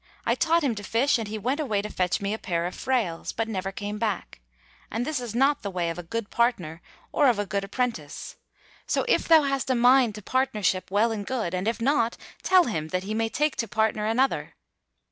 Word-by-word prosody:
I - - +3
taught 330 0 +2
him 265 -5 +1
to 205 -1 -7
fish 240 +5 +2
and 225 - -4
he 215 +1 -4
went 255 +8 -1
away 215 -9 0
to - - -3
fetch 185 +3 0
me 200 +1 -1
a 220 - -4
pair 170 -4 -1
of 180 - -3
frails, 230 -11 -1
but 225 0 -2
never 195 -3 -3
came 205 +2 -5
back: 210 - -3 0.5
and 230 +3 -2
this 310 -2 -1
is 240 -3 -6
not 275 +4 +3
the 200 - -4
way 175 -3 -1
of 165 - -7
a 170 -1 -10
good 230 -3 -3
partner 180 -9 0 0.3
or 290 - +3
of 235 - +2
a 205 - -1
good 200 0 -2
apprentice.' 200 - -3 0.5
So, - - +1
if - - +2
thou 320 -2 +7
hast 275 -1 -1
a 260 - +3
mind 245 -2 +5
to 210 - -9
partnership, 215 -8 0
well 210 +4 +2
and 215 -2 -3
good; 220 -6 -2
and 185 +3 -2
if 230 +1 0
not, 235 -2 +1 0.2
tell 370 -1 +5
him, 160 - -3
that 185 +3 -2
he 210 +2 -4
may 225 +1 0
take 300 +5 0
to 230 - -1
partner 215 0 0
another." 225 - 0
220 Hz, 230 wpm, -26 LUFS, 195-255 Hz, 0.5 s, thou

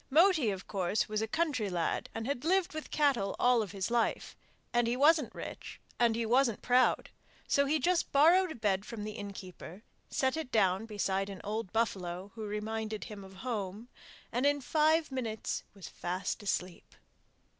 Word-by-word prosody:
Moti, 315 - +5
of 190 -2 -4
course, 195 +1 0
was 215 0 -1
a 220 - -1
country 285 -7 0
lad 175 -2 -1
and 225 - -3
had 265 -1 -2
lived 370 +2 +2
with 310 0 -6
cattle 270 -10 +1
all 245 -1 +4
his 195 +3 -4
life, 235 -1 0 0.4
and 240 -1 +3
he 240 +1 0
wasn't 300 -1 +4
rich - - -8 0.2
and 235 -2 +4
he 230 0 -1
wasn't 240 -1 +2
proud, 250 +1 +3 0.4
so 280 0 +3
he 305 +3 +2
just 350 +2 +1
borrowed 335 +6 +5
a - - -6
bed 200 -4 0
from 225 -2 -6
the 215 - -4
innkeeper, 200 -2 -9 0.3
set 265 +1 +1
it 315 -5 -4
down 200 -1 +2
beside 195 -2 -1
an 195 - -7
old 210 -2 -3
buffalo 190 -4 -2
who 220 -2 -6
reminded 215 +1 -3
him 210 -3 -8
of 190 0 -12
home, 215 -1 -4 0.4
and 250 +4 +2
in 285 0 +2
five 310 +2 +2
minutes 230 -5 -3
was 195 - -9
fast 180 +5 -3
asleep. 185 -3 -3
225 Hz, 175 wpm, -32 LUFS, 200-275 Hz, 0.4 s, Moti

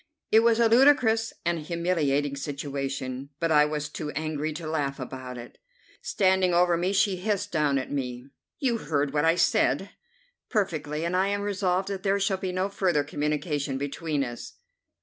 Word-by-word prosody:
It 220 - +7
was 230 0 +3
a 230 - +5
ludicrous 230 -2 +4
and 170 -1 +1
humiliating 150 -4 0
situation, 140 -2 -4
but 165 -1 0
I 150 -1 +6
was 150 0 -3
too 150 0 -6
angry 155 0 -2
to 155 +2 -7
laugh 145 -3 -2
about 130 -1 -7
it. 120 - -11 0.4
Standing 185 -2 +2
over 175 0 +4
me, 175 +3 0
she 200 -1 +2
hissed 205 +1 -2
down 150 -4 +2
at 130 - -4
me: 125 -3 -3 0.3
"You 245 -6 0
heard 145 -4 -1
what 145 +1 +2
I 165 +1 +4
said." - - +2 0.6
"Perfectly, 160 -8 -1
and 170 +2 -1
I 190 +1 +2
am 200 0 -1
resolved 190 -2 0
that 195 -1 -4
there 195 +1 +1
shall 195 -1 +1
be 190 -1 -3
no 185 +1 0
further 185 -7 +1
communication 145 -2 -2
between 145 +1 -2
us." 120 -2 -7
160 Hz, 170 wpm, -26 LUFS, 145-195 Hz, 0.6 s, It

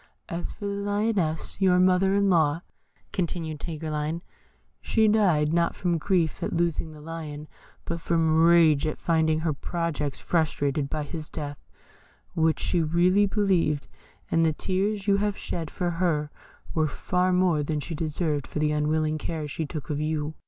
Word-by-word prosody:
"As 170 -1 -4
for 205 - -8
the 200 - -1
Lioness, 200 -4 -1
your 185 -2 +5
mother 185 +1 +4
in 200 0 +3
law," 165 -2 +2 0.5
continued 165 -4 -3
Tigreline, 155 +1 -3 0.6
"she 220 -1 +2
died, 175 -8 +3
not 170 0 +2
from 175 -2 0
grief 170 -2 0
at - - -2
losing 165 -1 0
the 155 - -12
Lion, 155 -1 -7 0.4
but 170 0 -3
from 160 -1 +2
rage 165 -3 +5
at 155 - -3
finding 160 -1 +1
her 160 -2 0
projects 150 -2 -3
frustrated 145 -4 0
by 155 0 -2
his 155 +1 -6
death, 145 -2 -6 0.7
which 160 0 +2
she 175 - +1
really 180 +5 +3
believed; 185 -8 +1 0.4
and 165 - +3
the 160 -1 +3
tears 195 +4 -1
you 200 -1 +4
have 205 0 0
shed 165 -3 -4
for 175 -1 -2
her 165 -4 0 0.4
were 155 -1 +2
far 180 +5 0
more 180 -4 +3
than 150 +1 -1
she 165 - -5
deserved 155 -2 -2
for - - -6
the 150 0 +2
unwilling 155 +1 0
care 155 -1 -4
she 150 +2 -4
took 150 +1 -6
of 145 - -1
you." 155 0 -2
165 Hz, 165 wpm, -26 LUFS, 155-180 Hz, 0.7 s, your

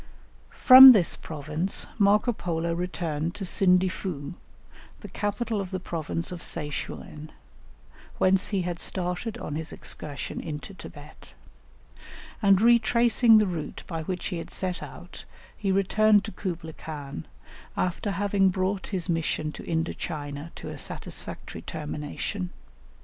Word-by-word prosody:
From 260 0 +10
this 190 -7 +3
province 155 +4 -3
Marco 210 +4 +4
Polo 170 -4 -2
returned 170 -2 -3
to 195 - -4
Sindifu, 180 -5 +1 0.7
the - - -8
capital 210 +1 -2
of 190 - -6
the 185 0 -3
province 165 -1 -4
of 175 -2 -6
Se 150 - -3
chuen, 150 +1 -7 0.9
whence 190 +1 +3
he 195 -3 -1
had 175 -1 -4
started 180 +4 -3
on - - -6
his 155 +1 -5
excursion 145 -2 -4
into 155 +4 -7
Thibet; - - -13 1.1
and 195 -3 +5
retracing 235 0 +5
the 215 - +4
route 170 -5 -5
by 165 -2 -4
which 180 +3 -4
he 175 -4 -3
had - - -8
set 180 -2 -2
out, - - -10 0.3
he 195 -2 -1
returned 205 +2 +4
to 215 - -6
Kublaï 165 -6 -5
Khan, 145 - -7 0.5
after 185 +3 -1
having 200 0 +2
brought 190 +1 -1
his 185 -4 -2
mission 165 -2 -1
to - - -10
Indo 165 0 -1
China 145 +1 -6
to - - -8
a - - -7
satisfactory - - -6
termination. 155 +5 -5
180 Hz, 135 wpm, -26 LUFS, 160-200 Hz, 1.1 s, From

